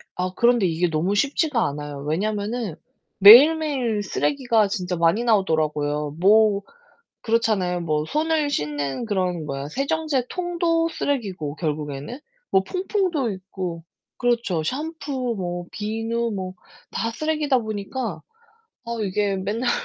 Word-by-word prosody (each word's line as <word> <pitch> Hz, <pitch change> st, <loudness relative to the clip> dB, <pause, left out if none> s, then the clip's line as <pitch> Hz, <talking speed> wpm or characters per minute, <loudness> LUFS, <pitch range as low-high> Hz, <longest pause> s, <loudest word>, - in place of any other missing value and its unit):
아 180 Hz, 0 st, -2 dB
그런데 235 Hz, -4 st, +3 dB
이게 170 Hz, +1 st, +1 dB
너무 165 Hz, +5 st, 0 dB
쉽지가 280 Hz, +2 st, +1 dB
않아요. 145 Hz, 0 st, -6 dB
왜냐하면은 205 Hz, +6 st, -2 dB, 0.5 s
매일매일 255 Hz, 0 st, +7 dB
쓰레기가 235 Hz, -1 st, +1 dB
진짜 185 Hz, -3 st, -3 dB
많이 170 Hz, +8 st, +2 dB
나오더라고요. 150 Hz, -8 st, 0 dB
뭐 205 Hz, +1 st, +4 dB, 0.6 s
그렇잖아요. 215 Hz, -6 st, +1 dB
뭐 155 Hz, -3 st, -1 dB
손을 310 Hz, -, 0 dB
씻는 150 Hz, -, -2 dB
그런 180 Hz, -6 st, -1 dB
뭐야 140 Hz, 0 st, -5 dB
세정제 275 Hz, -, -1 dB
통도 340 Hz, -2 st, 0 dB
쓰레기고 195 Hz, -, -3 dB
결국에는 150 Hz, -, -4 dB, 0.3 s
뭐 190 Hz, -, +4 dB
퐁퐁도 365 Hz, -, -1 dB
있고 185 Hz, -3 st, -6 dB, 0.3 s
그렇죠. 235 Hz, -9 st, 0 dB
샴푸, 275 Hz, -, -3 dB
뭐 175 Hz, -1 st, -4 dB
비누, 225 Hz, +2 st, -2 dB
뭐 185 Hz, -1 st, -5 dB, 0.4 s
다 230 Hz, -, -1 dB
쓰레기다 300 Hz, -1 st, 0 dB
보니까 215 Hz, -4 st, -4 dB, 0.6 s
아 235 Hz, -, -7 dB
이게 200 Hz, 0 st, 0 dB
맨날 215 Hz, +6 st, -1 dB
210 Hz, 280 characters per minute, -23 LUFS, 175-255 Hz, 0.6 s, 매일매일